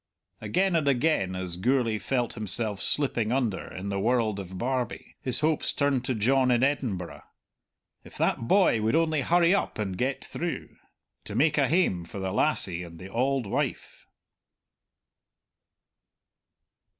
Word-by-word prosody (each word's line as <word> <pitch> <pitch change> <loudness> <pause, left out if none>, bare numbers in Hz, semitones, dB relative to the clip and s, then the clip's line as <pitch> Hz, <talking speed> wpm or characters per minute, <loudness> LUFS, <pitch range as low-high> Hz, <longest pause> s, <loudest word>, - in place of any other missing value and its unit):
Again 180 - 0
and 155 -3 +1
again, 125 - +1
as 90 -2 -3
Gourlay 115 +1 +1
felt 120 -2 -1
himself 105 -1 +1
slipping 120 -6 +2
under 120 -7 -1
in 95 +2 -6
the 100 0 -2
world 110 -1 +1
of 95 -1 -7
Barbie, 125 +1 -3
his 130 +3 +3
hopes 155 0 +1
turned 140 -3 +1
to 130 -1 -1
John 130 +4 +2
in 120 0 +3
Edinburgh. 120 -11 -2 0.8
If - - -13
that 115 - 0
boy 185 - +4
would 110 +6 +1
only 160 -2 +2
hurry 170 +4 +3
up 200 - -1
and 100 -4 -3
get 130 +7 -2
through, 170 0 -5 0.5
to - - -7
make 155 +1 +3
a 135 - +3
hame 140 - +1
for 90 - -10
the 95 -1 -3
lassie 95 - 0
and 85 -1 -10
the 95 +3 -10
auld 130 +2 0
wife! 100 - -4
120 Hz, 150 wpm, -27 LUFS, 100-140 Hz, 0.8 s, boy